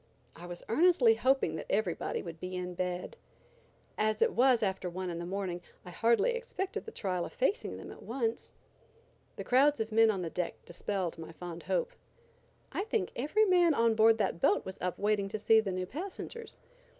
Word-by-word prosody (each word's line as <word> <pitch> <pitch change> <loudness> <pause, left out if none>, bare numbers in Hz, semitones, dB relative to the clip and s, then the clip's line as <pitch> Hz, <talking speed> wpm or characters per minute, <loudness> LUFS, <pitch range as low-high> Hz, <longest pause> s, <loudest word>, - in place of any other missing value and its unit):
I 175 +2 -10
was 175 0 -8
earnestly 360 - +5
hoping 265 - +1
that - - -7
everybody 195 -4 -1
would 165 -2 -8
be 185 +1 -5
in 180 0 -4
bed. 180 0 -3 0.8
As 215 0 +1
it - - +3
was 245 -2 +4
after 190 -2 -1
one 180 +1 -4
in 170 - -5
the 170 - -5
morning, 185 -2 -3 0.2
I 180 - -8
hardly 230 - +3
expected 475 -5 -4
the 450 - -7
trial 185 - -2
of - - -7
facing 395 - -1
them - - -9
at - - -12
once. 230 -1 -3 0.8
The - - -5
crowds 285 +4 +4
of 220 0 -2
men 225 +1 +5
on 195 -4 0
the 165 - -4
deck 180 -1 -2
dispelled 175 -1 -3
my 165 0 -8
fond 170 0 -8
hope. - - -1 0.8
I 395 - -2
think 440 -4 -1
every 305 - +2
man 350 -5 +4
on 230 -2 +3
board 220 0 +5
that 190 -5 -1
boat 205 - +3
was 190 - -7
up 180 -1 -2
waiting 205 -1 +1
to 215 - -3
see 220 +1 +5
the 210 -3 -1
new 185 0 -2
passengers. 390 - -7
215 Hz, 195 wpm, -31 LUFS, 180-275 Hz, 0.8 s, earnestly